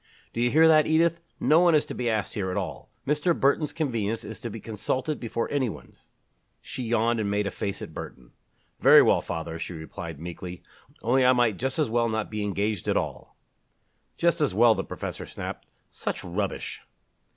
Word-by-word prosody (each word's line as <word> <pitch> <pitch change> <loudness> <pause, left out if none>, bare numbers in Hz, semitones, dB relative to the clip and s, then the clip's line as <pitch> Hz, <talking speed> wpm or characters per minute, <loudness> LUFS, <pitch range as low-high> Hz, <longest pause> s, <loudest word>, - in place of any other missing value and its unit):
"Do 115 - -2
you 120 - +3
hear 160 +5 +6
that, 155 -1 +6
Edith? 170 +1 +3 0.2
No 155 +2 +5
one 175 -2 +5
is 150 - +3
to - - -6
be 120 -1 -1
asked 110 -2 -1
here 95 -3 -2
at 90 - -2
all. 90 -7 -5 0.2
Mr. 150 +4 +1
Burton's 145 +2 +2
convenience 115 -8 -2
is 110 - -8
to 120 - -5
be 115 +1 -7
consulted 130 +8 -2
before 115 -1 -2
any 135 -4 +1
one's." - - -12 0.5
She - - -7
yawned 115 0 +1
and 105 -2 -1
made 105 0 0
a 100 - -2
face 100 -1 -4
at - - -9
Burton. 60 -2 -9 0.5
"Very - - +8
well, - - +4
father," 80 -1 -5
she 90 - -5
replied 80 -1 -7
meekly, 90 +1 -7 0.4
"only 130 +3 +3
I 125 0 +6
might 120 -5 +2
just 130 +3 -2
as 155 -3 +2
well 115 +1 +1
not 110 -1 -2
be 105 -1 -2
engaged 100 -1 -1
at - - +2
all." - - -4 0.8
"Just 170 -1 +2
as 145 -10 +1
well!" 115 +1 +6
the - - -3
professor - - -6
snapped. - - -7 0.2
"Such - - -4
rubbish!" 95 +3 -3
115 Hz, 195 wpm, -26 LUFS, 100-140 Hz, 0.8 s, Very